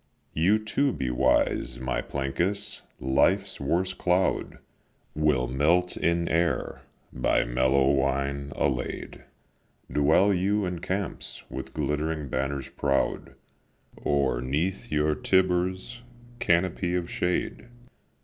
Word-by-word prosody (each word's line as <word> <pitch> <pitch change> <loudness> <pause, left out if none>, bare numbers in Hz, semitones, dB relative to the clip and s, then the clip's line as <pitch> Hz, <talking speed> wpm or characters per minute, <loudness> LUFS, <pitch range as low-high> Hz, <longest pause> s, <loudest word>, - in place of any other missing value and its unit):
You 90 +7 +3
too 130 +6 0
be 65 - -2
wise, 65 +1 +1
my 65 0 -1
Plancus: 90 +10 -2 0.2
life's 95 +9 +2
worst 90 +6 0
cloud 90 +1 +1 0.6
Will 75 -5 +2
melt 80 +8 +2
in 85 0 +1
air, 85 +1 0 0.3
by 60 - +2
mellow 65 +2 +2
wine 70 +1 0
allay'd, 65 -2 -2 0.7
Dwell 85 +8 +4
you 100 +3 +1
in 90 -1 -3
camps, 95 +2 -4
with - - -7
glittering 75 -1 -1
banners 70 +1 -2
proud, 70 -1 -1 0.6
Or 70 -4 0
'neath 85 - -2
your 75 0 +2
Tibur's 95 +6 0 0.4
canopy 90 0 +1
of 90 -1 -1
shade. 90 +5 -2
80 Hz, 105 wpm, -27 LUFS, 70-95 Hz, 0.7 s, Dwell